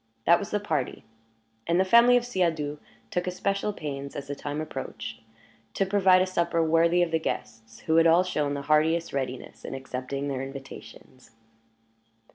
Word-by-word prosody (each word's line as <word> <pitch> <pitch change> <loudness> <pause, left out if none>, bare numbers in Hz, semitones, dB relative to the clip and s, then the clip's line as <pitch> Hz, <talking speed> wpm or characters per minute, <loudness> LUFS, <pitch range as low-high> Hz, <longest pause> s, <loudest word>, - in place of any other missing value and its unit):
That 170 - +6
was 200 - -6
the 210 - 0
party; 155 -10 -3 0.6
and 170 +1 +2
the 190 - +3
family 235 +5 +6
of 245 - -1
Siadoux 160 -9 -1 0.3
took 180 +1 -2
especial 195 +3 -1
pains, 140 -7 -6
as 140 - -5
the 145 - -3
time 145 +1 -5
approached, 135 -7 -6 0.5
to 195 - +1
provide 190 -2 +4
a - - 0
supper 170 -2 0
worthy 165 +2 +3
of 170 - -2
the 160 - +1
guests, 115 -7 -6
who 160 0 +1
had 165 0 +6
all 170 +2 +5
shown 150 -6 -1
the 140 - -5
heartiest 160 +3 +2
readiness 130 -2 -5
in - - -6
accepting 135 +1 -5
their 135 -2 -2
invitations. 135 -2 -11
160 Hz, 170 wpm, -27 LUFS, 140-185 Hz, 0.6 s, That